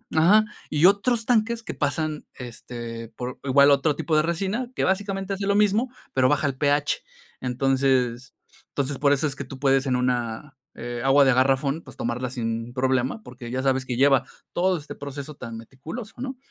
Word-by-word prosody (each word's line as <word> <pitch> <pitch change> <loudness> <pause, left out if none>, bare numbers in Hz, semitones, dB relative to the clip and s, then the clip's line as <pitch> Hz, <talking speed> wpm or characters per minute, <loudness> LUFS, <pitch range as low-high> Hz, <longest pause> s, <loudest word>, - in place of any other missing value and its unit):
Ajá. 195 +7 +6 0.2
Y 150 +2 +3
otros 220 +4 +3
tanques 230 0 +1
que - - -5
pasan, 155 +1 -2
este, 115 -2 -7
por 125 +2 -7
igual 140 +1 +5
otro 140 +1 +3
tipo 160 - -1
de 155 - +5
resina, 195 +9 -2
que - - 0
básicamente 195 0 -1
hace 195 0 -3
lo 200 - +2
mismo, 210 +4 +2 0.2
pero 130 -1 +3
baja 150 0 +2
el 135 - -2
pH. 145 +1 +1 0.4
Entonces, 130 -1 +1 0.4
entonces, 140 0 -2
por 140 0 +3
eso 145 +2 +2
es 135 - -4
que 140 - -5
tú 130 +1 -10
puedes 135 0 +3
en 130 -2 +1
una, 125 +2 -2 0.2
eh, 120 0 -5
agua 135 +1 +5
de 135 - +5
garrafón, 135 +4 +2
pues, - - -13
tomarla 120 +2 -2
sin 115 -1 -3
problema, 130 - 0
porque 125 -1 -9
ya 130 +1 -1
sabes 130 -1 +1
que 125 -2 -3
lleva 135 +1 +5 0.3
todo 185 +1 +2
este 150 -2 -9
proceso 140 +1 -7
tan 115 -4 -7
meticuloso, 155 - -8
¿no? 260 0 -5
140 Hz, 185 wpm, -24 LUFS, 125-170 Hz, 0.4 s, Ajá